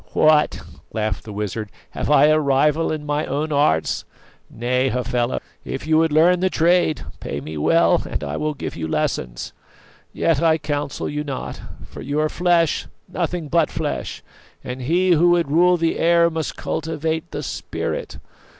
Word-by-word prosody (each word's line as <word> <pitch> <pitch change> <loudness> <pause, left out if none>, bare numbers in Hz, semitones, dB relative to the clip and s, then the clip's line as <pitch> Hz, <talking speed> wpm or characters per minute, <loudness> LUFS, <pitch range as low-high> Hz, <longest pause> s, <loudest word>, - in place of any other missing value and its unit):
"What," 155 -1 +3 0.3
laughed 110 -2 -2
the 110 - -7
wizard, 105 +1 -4 0.2
"have - - -3
I - - +6
a 155 +1 +4
rival 150 +3 +2
in 155 -1 -4
my 150 +1 -1
own 150 +3 -2
arts? 140 - +1 0.5
Nay, 125 +3 0
Hafela, 125 -1 -1 0.2
if 135 +2 -5
you 160 0 +3
would 160 -1 +2
learn 170 +4 +4
the 185 +1 +2
trade, 170 -2 +2 0.2
pay 70 - -4
me 75 +3 -7
well 165 - +3
and - - -3
I - - -3
will 155 0 -2
give - - -5
you 80 -1 -4
lessons. - - -2 0.6
Yet 160 -4 +1
I 160 -1 +4
counsel 145 -2 -3
you 150 0 -3
not; 140 -3 -5 0.2
for - - -10
you 145 +1 -2
are 155 0 +1
flesh, 175 -2 +1 0.2
nothing 175 -2 -3
but 165 +3 +2
flesh, 150 -1 -4 0.4
and 125 +1 -6
he 175 +8 +2
who 175 +1 +5
would 170 -5 +1
rule 175 +3 +4
the 165 -1 0
air 170 0 +4
must 160 -1 -3
cultivate 160 +1 -3
the - - -5
spirit. - - -4
155 Hz, 170 wpm, -21 LUFS, 135-165 Hz, 0.6 s, I